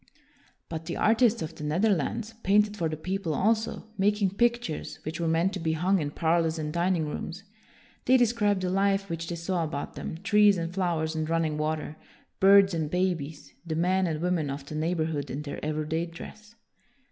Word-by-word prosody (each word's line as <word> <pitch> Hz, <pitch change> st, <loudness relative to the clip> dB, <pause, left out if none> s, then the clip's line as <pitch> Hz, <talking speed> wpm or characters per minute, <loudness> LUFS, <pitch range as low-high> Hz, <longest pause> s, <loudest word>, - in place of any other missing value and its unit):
But 160 Hz, -1 st, -6 dB
the 170 Hz, -, -3 dB
artists 230 Hz, -1 st, +3 dB
of 160 Hz, +1 st, -6 dB
the 160 Hz, -, -9 dB
Netherlands 205 Hz, +6 st, 0 dB
painted 210 Hz, +1 st, +3 dB
for 165 Hz, -5 st, -1 dB
the 155 Hz, -, -4 dB
people 180 Hz, -1 st, -2 dB
also, 220 Hz, +5 st, 0 dB
making 205 Hz, -1 st, +2 dB
pictures 235 Hz, -5 st, -1 dB
which 155 Hz, +2 st, -5 dB
were 170 Hz, -, 0 dB
meant 165 Hz, +4 st, +2 dB
to 190 Hz, -, -4 dB
be 160 Hz, -1 st, 0 dB
hung 185 Hz, +4 st, +2 dB
in 145 Hz, -, -2 dB
parlors 165 Hz, +1 st, +1 dB
and 150 Hz, -1 st, -3 dB
dining 175 Hz, -1 st, +1 dB
rooms. 170 Hz, +5 st, -5 dB, 0.6 s
They 260 Hz, +1 st, +6 dB
described 215 Hz, -5 st, +2 dB
the 180 Hz, -, 0 dB
life 195 Hz, 0 st, +1 dB
which 165 Hz, 0 st, -4 dB
they 175 Hz, -, -3 dB
saw 170 Hz, +1 st, -1 dB
about 145 Hz, -3 st, -4 dB
them, -, -, -6 dB
trees 210 Hz, -1 st, +5 dB
and 170 Hz, 0 st, -3 dB
flowers 170 Hz, -4 st, 0 dB
and 155 Hz, 0 st, -2 dB
running 165 Hz, -2 st, +1 dB
water, 155 Hz, 0 st, -2 dB, 0.4 s
birds 195 Hz, 0 st, +6 dB
and 160 Hz, -3 st, -1 dB
babies, 165 Hz, -4 st, -2 dB
the 165 Hz, -2 st, -3 dB
men 185 Hz, +3 st, +2 dB
and 155 Hz, -2 st, -2 dB
women 175 Hz, -4 st, 0 dB
of 140 Hz, 0 st, -5 dB
the 150 Hz, -, -8 dB
neigh 160 Hz, +3 st, 0 dB
borhood 155 Hz, -4 st, -2 dB
in 140 Hz, +4 st, -4 dB
their 145 Hz, -1 st, -7 dB
everyday 155 Hz, +2 st, -1 dB
dress. 210 Hz, +6 st, -11 dB
170 Hz, 190 wpm, -27 LUFS, 155-195 Hz, 0.6 s, They